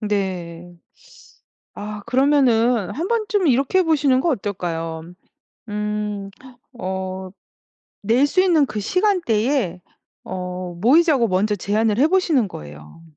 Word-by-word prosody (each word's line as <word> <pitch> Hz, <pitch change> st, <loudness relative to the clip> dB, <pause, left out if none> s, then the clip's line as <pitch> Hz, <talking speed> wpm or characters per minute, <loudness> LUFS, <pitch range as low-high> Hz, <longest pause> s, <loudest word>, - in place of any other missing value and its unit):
네. 180 Hz, -5 st, -3 dB, 1.0 s
아 210 Hz, 0 st, -7 dB
그러면은 245 Hz, -5 st, +2 dB
한 330 Hz, +7 st, -3 dB
번쯤 430 Hz, -5 st, 0 dB
이렇게 275 Hz, +7 st, +2 dB
해 -, -, +5 dB
보시는 290 Hz, -5 st, +2 dB
거 340 Hz, -, 0 dB
어떨까요? 170 Hz, -, -4 dB, 0.6 s
음, 210 Hz, -1 st, -3 dB, 0.5 s
어 190 Hz, -1 st, -4 dB, 0.7 s
낼 235 Hz, +7 st, +3 dB
수 370 Hz, +6 st, +1 dB
있는 340 Hz, -6 st, +4 dB
그 220 Hz, -6 st, -4 dB
시간대에 260 Hz, -, 0 dB, 0.5 s
어 180 Hz, -1 st, -5 dB
모이자고 270 Hz, -, +4 dB
먼저 200 Hz, +3 st, +1 dB
제안을 210 Hz, +2 st, 0 dB
해 285 Hz, -, +5 dB
보시는 320 Hz, -, +2 dB
거예요. 75 Hz, -, -11 dB
215 Hz, 225 characters per minute, -21 LUFS, 185-285 Hz, 1.0 s, 해